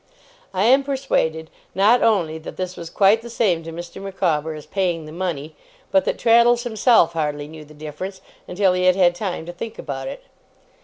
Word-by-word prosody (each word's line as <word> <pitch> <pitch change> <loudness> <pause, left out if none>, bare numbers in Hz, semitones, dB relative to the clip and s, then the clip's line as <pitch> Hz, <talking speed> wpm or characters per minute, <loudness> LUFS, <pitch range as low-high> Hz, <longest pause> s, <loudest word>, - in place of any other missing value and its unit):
I 190 0 0
am 265 +5 +5
persuaded, 210 - -1 0.2
not 210 +6 +4
only 170 -8 +1
that 160 - -9
this 185 0 -4
was 170 -1 -8
quite 200 +5 +4
the 235 - -9
same 200 -8 +1
to 165 0 -8
Mr. 170 +2 -8
Micawber 165 -6 -1
as 150 - -10
paying 180 -5 -1
the 155 - -10
money, 160 -3 -4 0.4
but 190 -1 +3
that - - -1
Traddles 235 +1 +4
himself 220 -6 +3
hardly 150 -2 -2
knew 155 0 -11
the 150 +1 -16
difference 155 +6 -7 0.3
until 190 0 +2
he 180 0 0
had 185 -1 +5
had 180 -2 +4
time 175 -3 -4
to 175 - -7
think 220 +6 -7
about 135 -2 -5
it. - - -7
180 Hz, 195 wpm, -21 LUFS, 160-205 Hz, 0.4 s, am